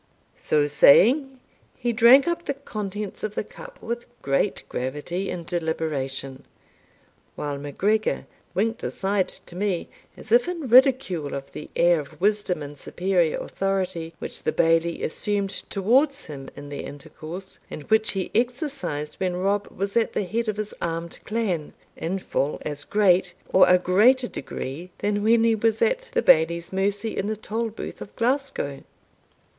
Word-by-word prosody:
So 150 -1 +1
saying, 250 - +5 0.4
he 240 -2 -1
drank 245 +5 +7
up 340 0 -1
the 280 - -2
contents 210 -6 -5
of 215 -1 -3
the - - -1
cup - - -12
with 235 +1 -4 0.2
great 140 0 0
gravity 150 +9 -3
and 170 -2 -5
deliberation, 155 -6 -3 0.9
while 145 -1 -4
MacGregor 200 +10 0 0.3
winked 225 +4 0
aside 195 -1 0 0.2
to 175 - -11
me, 190 -2 -1 0.3
as 220 - -11
if 240 +5 +5
in 335 -6 -3
ridicule 250 - +4
of 135 0 -7
the 150 - -8
air 170 -1 +4
of 145 - -10
wisdom 200 -5 +1
and 145 0 -9
superior 175 -2 +1
authority 185 -4 -2
which - - -5
the - - 0
Bailie 165 +1 +2
assumed 200 +3 -1 0.2
towards 270 +9 +2
him 135 -3 -8
in 145 0 -9
their 145 - -5
intercourse, 160 +6 -9
and 150 - -7
which 220 +5 +2
he 190 -2 -3
exercised 245 - -2
when 185 -2 0
Rob 200 +3 0
was 200 +1 -4
at 230 -1 +2
the - - 0
head 225 +5 -2
of 210 - -2
his 215 -1 -4
armed 165 0 -3
clan, 210 -9 -2 0.2
in 180 +4 -2
full 150 -5 -1
as 145 -1 -3
great, 185 -3 +3
or 190 - +6
a 180 - +7
greater 220 +9 +4
degree, 140 - -6
than 205 0 0
when 225 +2 +4
he 230 0 +4
was 220 0 +1
at - - +1
the 480 - +2
Bailie's 170 +2 +4
mercy 200 +3 -1
in 195 - -1
the 215 0 -2
Tolbooth 220 +1 -4
of - - -9
Glasgow. 240 - -1
195 Hz, 155 wpm, -25 LUFS, 165-225 Hz, 0.9 s, drank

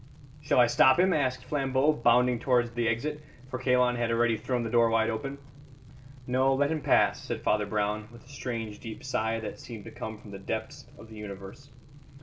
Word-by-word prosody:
"Shall 145 - +2
I 120 - +8
stop 130 +3 +5
him?" 185 0 +4
asked 130 -3 -1
Flambeau, 135 +1 +1
bounding 120 -1 +3
towards 120 -2 +2
the 120 0 -1
exit, 150 +7 -2 0.3
for 130 - -3
Kalon 125 -1 +2
had 120 -1 0
already 115 0 +2
thrown 120 +3 -2
the 115 - -3
door 115 -1 +4
wide 115 0 +2
open. 135 +5 -4 0.9
"No; 130 +2 +2
let 145 +2 +1
him 160 -1 -1
pass," - - +2
said - - -4
Father 105 -1 +1
Brown, 105 0 -1
with 120 -1 -15
a - - -19
strange 115 -6 -5
deep 110 -2 -8
sigh 115 -4 -1
that 110 - -6
seemed 115 -4 -9
to - - -10
come 110 0 -6
from 105 - -13
the 100 - -8
depths 115 +7 -5
of 110 - -13
the 110 - -11
universe. 100 +6 -9
120 Hz, 200 wpm, -28 LUFS, 110-130 Hz, 0.9 s, I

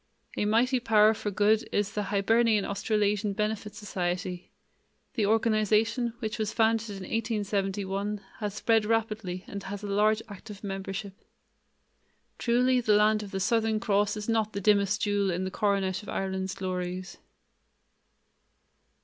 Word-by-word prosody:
A - - 0
mighty 245 +5 +3
power 220 -2 +5
for 210 - -4
good 210 +2 +2
is 205 0 0
the 210 -1 -2
Hibernian 210 +2 +2
Australasian 205 0 0
Benefit 210 0 -2
Society. 180 -3 -4 0.6
The 220 -5 +1
organization, 225 +2 +2
which 220 -1 -4
was 215 -1 -1
founded 225 0 +2
in 200 - -6
1871, 205 -2 -2 0.2
has 210 -2 -3
spread 225 0 +2
rapidly 215 -5 -1
and 200 - -6
has 200 +1 -7
a - - -4
large 215 +2 +2
active 205 0 -10
membership. 195 0 -5 1.3
Truly 250 +1 +3
the 215 -3 +3
land 215 +1 +4
of 205 - -7
the 195 - -3
Southern 220 +2 +1
Cross 205 -1 +1
is 210 - -5
not 220 -2 0
the 200 - -2
dimmest 200 0 +2
jewel 205 -1 +1
in 180 +1 -1
the 190 - -3
coronet 195 -2 0
of 210 - -11
Ireland's 190 -1 -2
glories. 185 0 -4
210 Hz, 140 wpm, -28 LUFS, 195-220 Hz, 1.3 s, power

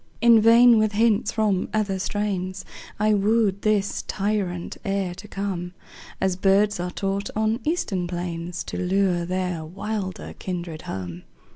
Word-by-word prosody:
In 230 -1 +6
vain 230 +1 +7
with 215 -1 +1
hints 220 0 +2
from 210 -5 0
other 200 -3 0
strains 190 -2 -2 0.3
I 215 0 +3
wooed 205 -1 +2
this 210 -2 +1
truant 195 -4 -2
air 195 -2 -1
to 190 +4 -11
come 185 -3 -4 0.4
As 190 -1 +1
birds 195 +2 +3
are 180 +1 -2
taught 195 +2 -2
on 220 +2 +1
eastern 205 - -1
plains 175 -1 -4
To - - -6
lure 185 -1 +1
their 180 -3 -2
wilder 190 +3 -5
kindred 175 -4 -5
home. 90 -2 -5
195 Hz, 140 wpm, -24 LUFS, 180-215 Hz, 0.4 s, vain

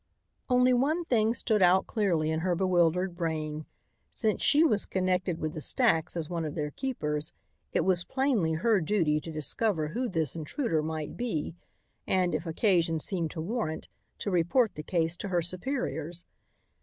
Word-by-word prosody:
Only 250 0 +4
one 305 +8 +1
thing 230 -4 +2
stood 220 -3 +1
out 185 +1 +5
clearly 170 -8 0
in 160 - 0
her 180 +1 0
bewildered 180 0 +2
brain: 155 -3 -3 0.4
Since 220 -3 0
she 300 +3 +5
was 215 -11 +2
connected 185 -2 0
with 155 -1 -3
the 155 - -4
stacks 175 - +2
as 160 -2 -3
one 170 -1 -3
of 155 -2 -4
their 150 -2 -2
keepers, 150 - -3 0.4
it - - +1
was 180 -2 +3
plainly 245 - 0
her 200 +5 +2
duty 155 -4 +1
to 165 - -7
discover 155 +2 -1
who 245 +9 -2
this 160 -6 -1
intruder 165 - -1
might 155 -1 -4
be 220 -12 -2 0.5
and, 180 -2 +1
if 160 +3 -2
occasion 165 -2 +2
seemed 165 0 -1
to 160 - -6
warrant, 175 -3 -3 0.3
to 200 - -3
report 180 +6 +2
the 150 - -6
case 165 +1 0
to 200 - -5
her 175 -2 +1
superiors. 175 - -3
175 Hz, 170 wpm, -29 LUFS, 160-215 Hz, 0.5 s, out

